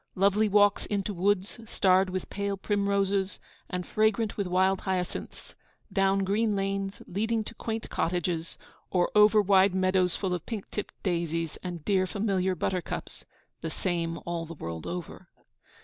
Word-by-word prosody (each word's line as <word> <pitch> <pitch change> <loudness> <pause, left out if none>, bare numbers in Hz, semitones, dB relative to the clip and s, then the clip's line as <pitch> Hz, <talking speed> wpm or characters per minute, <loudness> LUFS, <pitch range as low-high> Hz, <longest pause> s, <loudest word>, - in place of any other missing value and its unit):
Lovely 200 +3 +3
walks 205 0 +4
into 205 0 -1
woods, 200 +4 0
starred 190 0 +3
with 185 0 -3
pale 200 -1 -2
primroses, 200 -1 0 0.3
and 180 -1 -3
fragrant 220 0 +1
with 200 -3 -1
wild 185 +1 +2
hyacinths; 185 -2 -4 0.4
down 195 -1 +3
green 210 +2 +1
lanes, 195 0 -2
leading 220 +4 -1
to 230 - -8
quaint 225 0 -4
cottages, 170 -1 -1 0.3
or 180 -1 +1
over 210 0 +6
wide 190 -1 +5
meadows 185 -1 +2
full 190 -3 -1
of 175 -3 -3
pink 220 -4 -5
tipped 210 - -5
daisies 165 -3 -1
and 175 -4 -6
dear 190 -2 +2
familiar 190 -2 0
buttercups, 180 0 -3 0.4
the 165 - -3
same 170 0 -2
all 170 -1 -3
the 165 - -8
world 85 - -6
over. 175 0 -6
190 Hz, 150 wpm, -28 LUFS, 180-205 Hz, 0.4 s, over